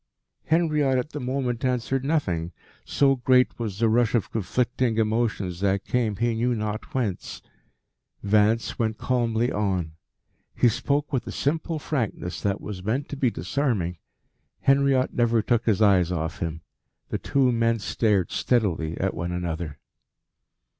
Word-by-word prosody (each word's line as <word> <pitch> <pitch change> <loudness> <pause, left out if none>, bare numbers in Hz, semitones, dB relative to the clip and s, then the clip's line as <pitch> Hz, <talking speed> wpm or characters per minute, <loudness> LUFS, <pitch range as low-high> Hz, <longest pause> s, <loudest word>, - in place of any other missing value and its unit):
Henriot 150 -3 +2
at 125 +4 -2
the 150 - -5
moment 125 -2 -2
answered 125 +1 0
nothing, 90 - -1 0.3
so 135 -1 +2
great 125 0 +3
was 105 -5 -3
the 115 +1 +2
rush 115 +1 +2
of 115 - 0
conflicting 115 +3 0
emotions 110 -5 0
that 100 0 0
came 115 -4 0
he 120 +3 0
knew 120 +2 0
not 110 +1 -4
whence. 110 -8 -2 0.8
Vance 105 +2 +2
went 110 -2 0
calmly 120 -1 0
on. 95 -6 -1 0.6
He 120 - +4
spoke 145 +6 -1
with 130 - -1
a - - -4
simple 160 +3 -1
frankness 120 - -3
that 100 -1 0
was 95 -3 -7
meant 125 +8 -1
to - - -4
be 135 -3 +2
disarming. 95 - -1 0.6
Henriot 135 -1 +3
never 120 -2 +2
took 120 -1 +1
his 110 -1 +3
eyes 90 -4 +4
off 80 -1 -3
him. 80 -1 -3 0.5
The - - -2
two 135 -2 +2
men 115 0 +2
stared 105 -3 0
steadily 85 -10 0
at 95 0 -1
one 85 0 -3
another. 85 -4 -4
115 Hz, 145 wpm, -25 LUFS, 100-130 Hz, 0.8 s, He